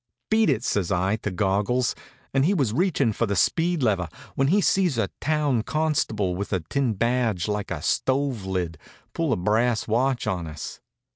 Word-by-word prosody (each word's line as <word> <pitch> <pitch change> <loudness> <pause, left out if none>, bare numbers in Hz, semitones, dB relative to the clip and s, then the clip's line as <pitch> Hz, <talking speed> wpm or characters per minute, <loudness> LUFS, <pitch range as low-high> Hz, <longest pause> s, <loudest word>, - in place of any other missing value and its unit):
"Beat 220 -1 +4
it!" 110 - +1
says 100 -8 0
I 95 +3 +1
to 105 - -3
Goggles, 105 +6 +1 0.4
and 135 0 +3
he 190 +7 +3
was 130 - +1
reachin' 145 - +1
for 115 - 0
the 100 - -1
speed 165 - +2
lever, 95 -7 +1 0.2
when 135 - +1
he 190 +8 +4
sees 185 - +2
a 105 -5 0
town 150 -5 +1
constable, 115 - 0
with 100 +2 -4
a 95 -3 0
tin 120 - -1
badge 115 -4 0
like 105 -1 -2
a - - -4
stove 130 -5 0
lid, 90 -4 -3 0.3
pull 165 -4 0
a 115 - +2
brass 110 +5 +1
watch 125 +2 +1
on 90 -6 -2
us. 75 -1 -7
115 Hz, 185 wpm, -25 LUFS, 100-140 Hz, 0.4 s, Beat